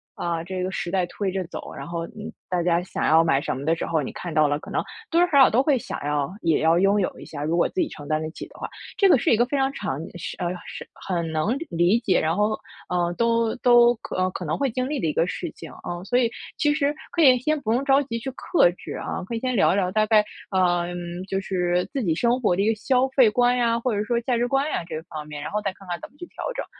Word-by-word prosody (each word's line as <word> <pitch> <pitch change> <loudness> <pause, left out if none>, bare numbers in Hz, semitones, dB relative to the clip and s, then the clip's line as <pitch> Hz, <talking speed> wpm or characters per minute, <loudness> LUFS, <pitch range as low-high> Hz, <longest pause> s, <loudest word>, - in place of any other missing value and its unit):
啊， 170 -1 -2
这 185 +1 -4
个 185 - -2
时 175 - -3
代 185 -1 +1
推 195 +2 -3
着 190 -1 -1
走。 - - -8
然 - - -7
后， 170 -1 -4
嗯， 215 +1 -9 0.2
大 180 -2 0
家 170 0 +2
想 180 - -4
要 165 +1 +5
买 140 -4 +2
什 - - -2
么 140 - -6
的 165 +1 +3
时 - - -4
候， 160 -2 0
你 130 - -4
看 175 -3 -6
到 155 -1 +4
了 145 0 0
可 - - -11
能 - - 0 0.3
多 335 - +3
多 - - +6
少 280 - +3
少 265 - +8
都 245 +4 +3
会 275 -2 +3
想 - - -5
要 145 +1 -1
也 165 -2 +2
要 165 +2 +4
拥 200 +1 +3
有 - - -3
一 - - -10
下， 145 -2 -6
如 165 +3 0
果 - - +3
自 370 - -2
己 315 - 0
承 145 -2 -10
担 155 0 0
得 155 0 -4
起 - - -8
的 - - -17
话。 - - -5 0.3
这 395 -2 +4
个 280 - +7
是 - - +1
一 - - +6
个 240 - +4
非 280 +3 -2
常 270 0 +1
常 135 +2 -3 0.2
是 - - -6
呃， 175 - -2 0.2
是 - - -8
很 170 -3 -3
能 205 +11 +1
理 175 +7 +3
解， 195 -6 +2
然 160 +2 +1
后， 210 +1 +1 0.3
呃， 175 -1 0
都 230 -1 +2
都 240 -1 +6
可 - - -8
呃， 185 0 +2
可 180 - -6
能 155 - -1
会 275 -2 +1
经 255 +2 -2
历 300 - -1
的 165 - 0
一 - - +1
个 170 - +2
事 - - -4
情， - - -11
呃。 175 0 -5
所 245 +4 +1
以 230 -2 +2 0.3
其 295 -1 +2
实 295 0 0 0.2
可 335 - 0
以 260 -4 +7
先 305 +3 0
不 220 +1 0
用 260 +3 +1
着 275 +1 +5
急 230 -4 -4
去 265 +3 -5
克 260 - +3
制 180 - -9
啊。 - - -4
可 230 - -4
以 - - -2
先 255 0 -1
聊 190 - +4
一 - - +1
聊， 185 -2 +1
大 215 +1 +2
概， 215 -1 +5 0.3
呃， 175 -2 +2 0.4
就 195 0 -1
是 180 -2 0
自 270 - -1
己 165 -4 +1
生 240 +5 +2
活 180 -6 +2
的 195 - 0
一 210 - +2
个 - - +3
消 255 +4 +2
费 260 -4 +5
观 245 +2 +3
呀， 230 -1 +2
或 240 -1 -1
者 205 - 0
说 235 +2 +1
价 240 0 0
值 240 +1 +1
观 270 +3 +1
呀 - - -1
这 155 - -4
方 155 -2 -8
面， 150 -1 -7
然 - - -5
后 210 0 -1
再 195 -2 -1
看 195 -1 -16
看 175 -1 -3
怎 - - -8
么 - - -29
去 350 - -7
调 - - -8
整。 - - -3
195 Hz, 315 characters per minute, -24 LUFS, 170-245 Hz, 0.4 s, 少